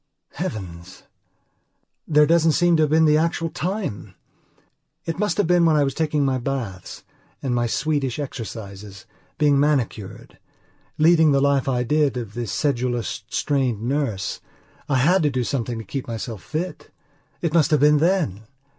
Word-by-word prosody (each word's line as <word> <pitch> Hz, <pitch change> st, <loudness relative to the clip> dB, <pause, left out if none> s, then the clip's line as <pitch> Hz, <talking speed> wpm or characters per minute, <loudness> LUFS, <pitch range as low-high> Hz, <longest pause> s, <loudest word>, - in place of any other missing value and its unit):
Heavens! 90 Hz, -3 st, -6 dB, 1.0 s
There 150 Hz, -1 st, +5 dB
doesn't 165 Hz, 0 st, +3 dB
seem 175 Hz, +1 st, +3 dB
to 155 Hz, -, +2 dB
have 155 Hz, -, +2 dB
been 160 Hz, +1 st, +4 dB
the 150 Hz, 0 st, +4 dB
actual 165 Hz, 0 st, -1 dB
time. 160 Hz, -, -4 dB, 0.9 s
It 165 Hz, +1 st, -4 dB
must 210 Hz, 0 st, 0 dB
have 205 Hz, -, +2 dB
been 175 Hz, 0 st, +3 dB
when 160 Hz, -2 st, +4 dB
I 150 Hz, -, +4 dB
was 135 Hz, -1 st, -1 dB
taking 150 Hz, -3 st, 0 dB
my 130 Hz, -1 st, 0 dB
baths, 120 Hz, -8 st, -5 dB, 0.4 s
and 130 Hz, -3 st, -1 dB
my 120 Hz, -1 st, +1 dB
Swedish 135 Hz, 0 st, -1 dB
exercises, 105 Hz, -7 st, -7 dB, 0.3 s
being 145 Hz, -3 st, +3 dB
manicured. 130 Hz, -9 st, -2 dB, 0.6 s
Leading 160 Hz, -1 st, +5 dB
the 140 Hz, -, +3 dB
life 140 Hz, -1 st, +2 dB
I 125 Hz, -2 st, 0 dB
did, 145 Hz, 0 st, +1 dB
of 115 Hz, -4 st, -6 dB
the 120 Hz, 0 st, -4 dB
sedulous, 120 Hz, -, -2 dB
strained 130 Hz, -7 st, -1 dB
nurse, 125 Hz, -6 st, -2 dB, 0.5 s
I 140 Hz, -, +2 dB
had 170 Hz, +9 st, +3 dB
to 150 Hz, -, +2 dB
do 130 Hz, -2 st, -1 dB
something 120 Hz, -2 st, -2 dB
to 115 Hz, -, -6 dB
keep 125 Hz, +6 st, -5 dB
myself 115 Hz, -3 st, -5 dB
fit. 165 Hz, -, -5 dB, 0.5 s
It 165 Hz, -2 st, 0 dB
must 165 Hz, -2 st, +4 dB
have 150 Hz, -4 st, +2 dB
been 150 Hz, 0 st, +5 dB
then! 160 Hz, -, +1 dB
140 Hz, 160 wpm, -22 LUFS, 120-155 Hz, 1.0 s, There